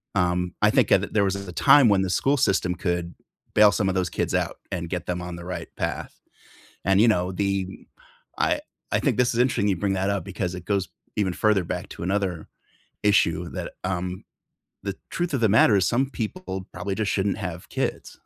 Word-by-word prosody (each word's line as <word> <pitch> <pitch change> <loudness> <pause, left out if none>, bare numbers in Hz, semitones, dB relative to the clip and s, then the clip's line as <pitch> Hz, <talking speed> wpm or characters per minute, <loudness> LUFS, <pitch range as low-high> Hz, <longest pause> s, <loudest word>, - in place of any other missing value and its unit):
um, 90 -1 +1
I 105 0 +5
think 130 0 +3
a - - +8
there 100 +2 0
was 95 -1 +1
a 100 -2 -6
time 135 - +6
when 100 -3 +4
the 95 - -1
school 135 +9 +2
system 95 -6 +1
could 85 -1 -2 0.4
bail 105 -1 +7
some 100 -1 0
of 95 - -1
those 90 -1 0
kids - - -2
out, - - -1
and 85 -2 -3
get 90 -1 -3
them 90 0 -2
on 90 0 -6
the 85 - -9
right 90 0 -5
path, - - -3 0.7
and, 95 +1 +4
you 115 - +6
know, 90 -4 +2
the 95 0 -2 0.5
I - - +2 0.3
I - - +2
think - - +1
this 125 -1 +3
is 115 - -1
interesting 120 -5 +2
you 95 - +1
bring 100 +2 0
that 95 +1 0
up, 100 -1 -1
because 90 -1 -3
it 90 -1 -9
goes 100 -4 0 0.3
even 100 -3 +1
further 105 0 +2
back - - -4
to - - -8
another 95 -3 -1 0.6
issue 90 -4 +2
that, - - -5
um 90 0 -3 0.6
the 100 -1 -4 0.2
truth 175 -1 -1
of 130 - +1
the 110 - +4
matter 105 - +6
is 95 - +3
some 130 +3 +1
people 110 - -5
probably 90 +3 -3
just 105 +1 -1
shouldn't 100 0 0
have 90 0 -8
kids, - - -3
95 Hz, 210 wpm, -25 LUFS, 90-105 Hz, 0.7 s, a